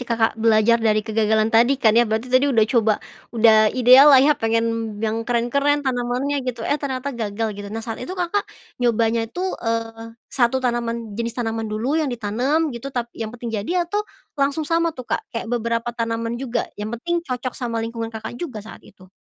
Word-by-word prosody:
Kakak, 225 -1 +2
belajar 225 +1 +4
dari 215 -1 +2
kegagalan 220 0 +1
tadi 240 +5 +4
kan 220 -5 +3
ya, 235 0 +4
berarti 220 +2 -1
tadi 260 +3 +4
udah 230 -5 +4
coba, 225 -3 +3 0.4
udah 220 -1 +6
ideal 255 +3 +8
lah 280 - +8
ya 275 +3 +6
pengen 230 -3 -1
yang 225 +2 -3
keren-keren 280 +5 +1
tanamannya 255 +2 -1
gitu, 250 -3 -4
eh, 290 - 0
ternyata 275 0 -3
gagal 225 -2 -3
gitu. 205 0 -8
Nah, 225 +2 -6
saat 225 - -6
itu, 315 +10 -6
Kakak, 365 +3 -1 0.3
nyobanya 230 -1 +1
tuh, 365 +9 -3
eee, 230 0 -4 0.2
1 245 0 +2
tanaman 235 -2 -2
jenis 230 +2 -4
tanaman 225 -2 -2
dulu 240 +9 -1
yang 305 - -1
ditanam 245 +8 0
gitu 235 +3 -6
tap 240 -3 -4
yang 225 - -5
penting 235 0 -7
jadi, 345 - -1
atau 410 +5 -1 0.4
langsung 280 +3 +1
sama 335 +2 +1
tuh, 255 - -7
Kak? - - +1
Kayak 230 - -5
beberapa 230 0 -1
tanaman 230 0 -2
juga, 245 -3 -2 0.2
yang 210 - -3
penting 345 +8 -2
cocok 255 0 -3
sama 240 -3 -4
lingkungan, 230 0 -4
Kakak, 220 +1 -8
juga 250 -12 -6
saat 220 - -11
itu? 185 -1 -18
235 Hz, 190 wpm, -21 LUFS, 225-260 Hz, 0.4 s, ideal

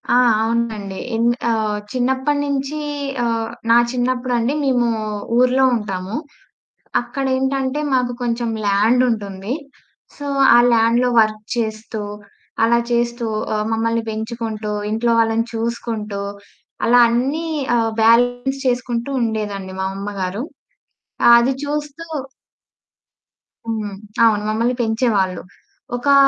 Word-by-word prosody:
ఆ! - - +6 0.2
అవునండి 225 -4 -1 0.2
ఎంద్ 235 +1 +2 0.2
ఆహ్, 215 -2 0
చిన్నప్పటి 265 +3 0
నుంచి 280 +1 -2 0.4
ఆహ్, 230 -1 -1 0.2
నా 235 - +7
చిన్నప్పుడండి 250 0 0
మేము 245 -3 +2 0.5
ఊర్లో 255 +1 +4
ఉంటాము. 195 -2 -4 0.9
అక్కడేంటంటే 265 0 -1
మాకు 250 -1 +1
కొంచెం 235 -1 -1 0.2
ల్యాండుంటుంది. 210 0 +1 0.6
సో, 285 - -6 0.3
ఆ - - +8
ల్యాండులో 235 +2 +3
వర్క్ 215 0 0
చేస్తూ, 220 -1 -3 0.6
అలా 235 +1 +4
చేస్తూ, 235 0 0 0.3
ఆహ్, 210 0 -1
మమ్మల్ని 230 +1 0
పెంచుకుంటూ, 220 -1 -4 0.2
ఇంట్లో 230 +2 +1
వాళ్ళని 225 0 +2
చూసుకుంటూ, 225 -3 -3 0.6
అలా 245 +1 +5
అన్నీ 270 +8 0 0.3
ఆహ్, 225 -1 +1
బ్యాలెన్స్ 245 +4 +3
చేసుకుంటూ 245 0 -1
ఉండేదండి 205 -4 -3
మా - - -1
అమ్మగారు. 200 +2 -3 0.9
అది 235 +3 +3
చూస్తూ 295 +2 -4 1.6
హ్మ్, 215 -3 -3 0.3
అవును 210 -2 +3
మమ్మల్ని 230 +3 +1
పెంచేవాళ్ళు. 220 -5 +1 0.5
ఒకా 280 +3 +2
235 Hz, 100 wpm, -20 LUFS, 220-250 Hz, 1.6 s, ఆ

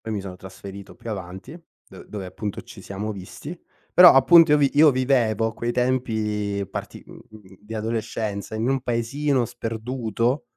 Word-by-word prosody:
poi 110 -1 -6
mi 105 - -2
sono 95 -1 -8
trasferito 95 +1 -11
più 115 - -8
avanti, 95 - -7 0.3
do - - -12
dove 100 -3 -6
appunto 100 +2 -5
ci 120 -3 -13
siamo 105 +3 -5
visti. 100 - -9 0.4
Però 180 0 +10
appunto, 165 +4 +7
io 150 - +5
vi 140 -2 +3
io 150 +1 +7
vivevo 125 -4 +1
a 115 - -2
quei 120 +2 -2
tempi 110 -5 -1
parti - - -7
mhmm, - - -13 0.4
di 105 +2 -9
adolescenza, 110 -1 -3
in 115 +3 -1
un 135 0 +1
paesino 125 +3 0
sperduto, 120 +2 -2
115 Hz, 165 wpm, -23 LUFS, 105-130 Hz, 0.4 s, Però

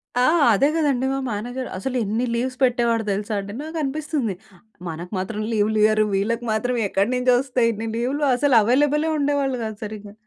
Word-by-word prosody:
ఆ! 245 - +3 0.3
అదే 270 +8 +3
కదండీ! 280 -5 +1
మా - - -1
మేనేజర్ 245 +5 -4
అసలు 255 +7 -4
ఎన్ని 220 +5 -1
లీవ్స్ 255 +2 -2
పెట్టేవాడో 235 -2 +2
తెలుసా 205 +2 -2
అండి. 200 +1 -7
నాకనిపిస్తుంది. 300 - -2 0.5
మనకు 170 +3 -7
మాత్రం 210 +3 -4
లీవులియ్యరు. 215 0 +3
వీళ్ళకి 230 +5 -1
మాత్రం 245 +3 0
ఎక్కడి 195 +4 0
నుంచి 250 0 +2
వస్తాయి 250 -3 +1
ఇన్ని 225 +2 -5
లీవ్‌లు 265 +5 -1
అసలు 275 0 +2
అవైలబులే 290 +7 +2
ఉండేవాళ్ళు 280 -2 0
కాదు 220 -1 -6
సరిగ్గా. 210 -1 -8
240 Hz, 160 wpm, -22 LUFS, 215-270 Hz, 0.5 s, ఆ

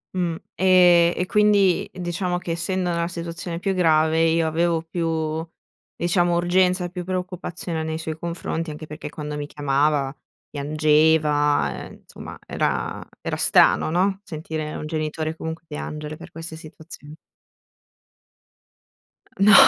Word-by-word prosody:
Mh, 175 -3 0 0.2
e 180 -2 +6
e 180 - 0
quindi 205 -2 +3
diciamo 180 0 -2
che 175 -1 -5
essendo 180 +2 -1
nella 170 0 0
situazione 170 0 -5
più 195 +3 -1
grave 160 -2 +3
io 165 0 +3
avevo 165 +1 +1
più 160 -1 -2 0.5
diciamo 175 0 +2
urgenza, 180 +1 +2
più 180 0 -6
preoccupazione 180 -2 -4
nei 160 0 -3
suoi 160 -1 -5
confronti, 170 -1 -3
anche 150 +1 -7
perché 150 0 -7
quando 150 0 -6
mi 145 0 -4
chiamava 145 -1 +1 0.4
piangeva, 150 - +2
ehm, - - -13
insomma - - -10
era - - -2 0.2
era - - -2
strano, - - +4
no. 190 +4 +1
Sentire 155 -3 -5
un - - -5
genitore 155 0 -3
comunque 160 0 -6
piangere 150 0 -6
per - - -11
queste 165 0 -8
situazion 155 -1 -12 2.3
No 205 +2 +6
165 Hz, 130 wpm, -23 LUFS, 155-175 Hz, 2.3 s, e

